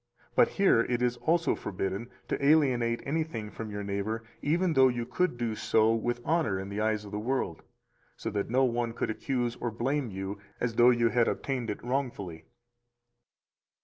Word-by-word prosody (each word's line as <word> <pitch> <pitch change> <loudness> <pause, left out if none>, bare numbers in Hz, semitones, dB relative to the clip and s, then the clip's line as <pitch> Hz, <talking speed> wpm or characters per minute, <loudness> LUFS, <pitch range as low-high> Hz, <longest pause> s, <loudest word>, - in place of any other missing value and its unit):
But - - +6
here 195 - +3
it 120 0 0
is 120 0 +1
also 170 +4 +2
forbidden 95 +4 -3 0.2
to - - -2
alienate 130 -6 +3
anything 140 -8 -2
from 110 -1 -6
your 105 0 -4
neighbor, 100 +3 -2 0.2
even 170 +3 +1
though 130 -2 +6
you 120 -2 -1
could 180 -1 0
do 120 -2 -1
so 110 +1 +3
with 120 +2 -1
honor 160 - +1
in 95 +1 -6
the 100 +1 -3
eyes 110 -1 0
of 100 - -10
the 105 - -3
world, 130 +5 -2 0.6
so - - -4
that 100 -1 -2
no 130 +3 +3
one 120 -2 0
could 115 - -2
accuse 120 0 -1
or 120 - -2
blame 130 +4 -1
you 95 +1 -5 0.2
as 120 -2 -1
though 120 +2 +6
you 120 -1 +3
had 120 0 +3
obtained 125 -4 -2
it 105 - -4
wrongfully. 120 - -3
120 Hz, 180 wpm, -29 LUFS, 105-130 Hz, 0.6 s, But